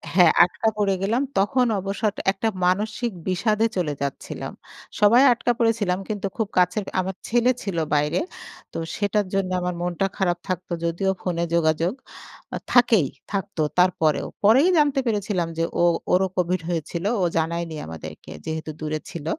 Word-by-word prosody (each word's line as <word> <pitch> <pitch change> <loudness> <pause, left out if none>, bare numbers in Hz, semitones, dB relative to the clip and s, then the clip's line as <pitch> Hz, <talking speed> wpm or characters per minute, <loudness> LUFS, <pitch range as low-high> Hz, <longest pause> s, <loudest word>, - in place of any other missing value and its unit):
হ্যাঁ, 175 -3 +7
আটকা 180 +5 -1
পড়ে 200 -2 +2
গেলাম। 225 +7 +1 0.2
তখন 245 +6 +3
অবসর 200 +2 -1 0.2
একটা 200 +3 -2 0.2
মানসিক 210 +5 0 0.2
বিষাদে 210 +4 +1
চলে 155 -5 0
যাচ্ছিলাম। 140 -1 -4 0.5
সবাই 220 +5 +6
আটকা 240 +1 0
পড়েছিলাম 215 -5 +1
কিন্তু 200 -2 -2
খুব 220 -3 0
কাছের, 180 +4 +3 0.2
আমার 185 0 -2
ছেলে 240 +2 +3
ছিল 190 -5 -3 0.2
বাইরে। 150 +1 +2 0.5
তো - - -6 0.2
সেটার 205 0 0
জন্য 195 -1 0
আমার 180 0 -1
মনটা 175 +2 -1
খারাপ 175 -2 +1
থাকতো। 185 -1 -4
যদিও 180 +3 0
ফোনে 170 -2 -1
যোগাযোগ, 165 +3 +2 0.8
থাকেই, 235 - +5 0.2
থাকতো 195 -4 -2 0.2
তারপরেও। 170 -4 +2 0.2
পরেই 260 - +6
জানতে 290 -2 +3
পেরেছিলাম 205 -5 0
যে, 165 - +1 0.2
ও - - +4 0.3
ওরও 190 +1 +4
কোভিড 180 0 +1
হয়েছিল। 170 +2 -3 0.2
ও - - +2
জানায়নি 165 0 -1
আমাদেরকে 80 -1 -9
যেহেতু 160 0 -4
দূরে 155 0 -2
ছিল। 160 -3 -7
185 Hz, 150 wpm, -23 LUFS, 170-210 Hz, 0.8 s, হ্যাঁ